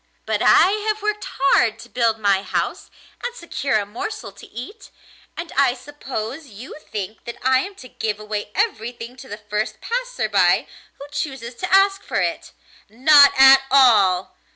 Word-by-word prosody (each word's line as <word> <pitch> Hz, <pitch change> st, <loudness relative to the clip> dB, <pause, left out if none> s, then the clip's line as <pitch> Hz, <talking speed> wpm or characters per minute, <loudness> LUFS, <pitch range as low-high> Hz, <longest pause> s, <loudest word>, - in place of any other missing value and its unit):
But -, -, -1 dB
I 375 Hz, -, +5 dB, 0.2 s
have 430 Hz, -1 st, -1 dB
worked 420 Hz, 0 st, -2 dB
hard 355 Hz, -12 st, +3 dB
to -, -, -12 dB
build 230 Hz, -2 st, 0 dB
my 200 Hz, -3 st, +1 dB
house -, -, -3 dB, 0.3 s
and 485 Hz, 0 st, -4 dB
secure 280 Hz, -, -2 dB
a 205 Hz, -, -2 dB
morsel 235 Hz, -, -6 dB
to -, -, -15 dB
eat, 255 Hz, -, -10 dB, 0.5 s
and 335 Hz, -1 st, -6 dB
I 270 Hz, -2 st, +3 dB
suppose 275 Hz, 0 st, -7 dB
you 230 Hz, +2 st, -11 dB, 0.2 s
think 210 Hz, +1 st, -6 dB
that 235 Hz, -, -7 dB
I 260 Hz, 0 st, +3 dB
am 395 Hz, +8 st, -6 dB
to 255 Hz, -, -12 dB
give 215 Hz, -3 st, -4 dB
away 210 Hz, -1 st, -5 dB
everything 240 Hz, -, -3 dB
to 265 Hz, +1 st, -12 dB
the 205 Hz, -, -7 dB
first 210 Hz, 0 st, -4 dB
passer -, -, -3 dB
by -, -, +2 dB, 0.3 s
who 280 Hz, -, -10 dB
chooses 265 Hz, -5 st, -5 dB
to 365 Hz, -, -5 dB
ask 390 Hz, +1 st, +4 dB
for -, -, -3 dB
it. -, -, -3 dB, 0.4 s
Not 280 Hz, +5 st, +6 dB
at 270 Hz, 0 st, +8 dB
all! 210 Hz, -9 st, +4 dB
260 Hz, 170 wpm, -21 LUFS, 220-340 Hz, 0.5 s, at